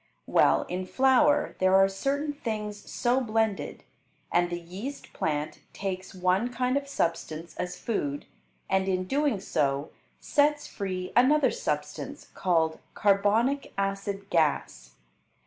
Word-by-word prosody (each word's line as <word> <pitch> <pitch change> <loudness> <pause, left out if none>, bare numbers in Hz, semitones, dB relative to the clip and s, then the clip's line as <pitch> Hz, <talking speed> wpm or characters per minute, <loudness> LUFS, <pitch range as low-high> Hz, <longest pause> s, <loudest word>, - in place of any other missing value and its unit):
Well, - - +4
in 185 +1 -3
flour 270 +5 +3
there 185 0 +4
are 195 0 +6
certain 280 +9 -1
things 210 -6 -5
so 245 +1 +2
blended, 220 -3 -1 0.5
and 175 0 +3
the 175 0 -3
yeast 195 +12 -8
plant 150 -1 -2
takes 190 -1 -5
one 185 +6 +1
kind 250 +1 0
of 280 0 -1
substance 165 - -2
as 180 0 -3
food, 145 -11 -2 0.4
and 190 0 +1
in 185 -1 +1
doing 275 +1 +1
so 140 -5 -1 0.3
sets 295 0 +2
free 185 -3 -4
another 275 +4 +5
substance 485 - -4
called 165 -3 +1 0.2
carbonic 210 +7 +2
acid 195 0 -2
gas. 145 - 0
195 Hz, 125 wpm, -28 LUFS, 180-255 Hz, 0.5 s, are